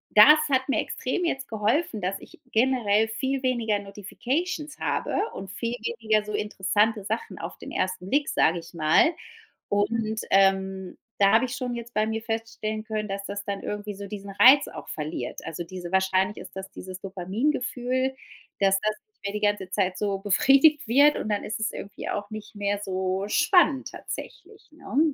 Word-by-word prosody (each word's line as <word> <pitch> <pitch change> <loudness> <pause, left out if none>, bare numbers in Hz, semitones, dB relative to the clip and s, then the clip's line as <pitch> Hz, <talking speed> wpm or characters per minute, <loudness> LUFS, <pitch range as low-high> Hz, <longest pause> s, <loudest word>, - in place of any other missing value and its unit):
das 300 +9 +9
hat 260 0 +2
mir 270 - +1
extrem 265 +8 -3
jetzt 270 -5 -1
geholfen, 220 +3 0
dass 190 +2 -1
ich - - -15
generell 225 -3 +3
viel 265 +4 -2
weniger 235 -5 +1
Notifications 270 - -4
habe - - -1 0.2
und 190 -1 -7
viel 230 +5 -3
weniger 220 - 0
so 210 - -6
interessante 210 +1 +1
Sachen 220 +3 -4
auf - - -7
den - - -9
ersten 185 0 -2
Blick, 285 +1 +2
sag 165 - +3
ich 170 0 -8
mal. 165 - +4 0.6
Und, 215 +1 0
ähm, 190 -1 +2 0.2
da 200 +1 +5
hab 225 - +5
ich 255 +1 -2
schon 250 -2 -3
jetzt 235 0 -8
bei 215 +1 +1
mir 220 0 -2
feststellen 225 -1 -3
können, 215 -1 -3
dass 200 0 -4
das 200 0 -5
dann 200 -1 -3
irgendwie 210 0 -4
so 200 0 -8
diesen 200 -1 -7
Reiz 260 +8 +7
auch 155 - -9
verliert. 155 0 -4
Also 170 +2 -5
diese 175 0 -8
wahrscheinlich 190 +1 +2
ist - - -10
das 190 +1 -7
dieses 185 -1 -8
Dopamin-Gefühl, 250 +6 -1 0.4
dass 195 -1 +3
das 215 0 0
nicht 430 - -47
mehr 200 +1 -3
die 210 - -3
ganze 205 -3 0
Zeit 190 -1 0
so 200 -2 -1
befriedigt 270 +8 +4
wird 285 +5 +5
und 215 - -3
dann 205 - 0
ist 220 - -4
es 220 - -1
irgendwie 200 - -7
auch 205 +1 -3
nicht 215 0 -8
mehr 205 0 -1
so 190 0 -1
spannend 305 - +3
tatsächlich, 410 +3 -9
ne? 310 -1 0
210 Hz, 180 wpm, -26 LUFS, 195-255 Hz, 0.6 s, das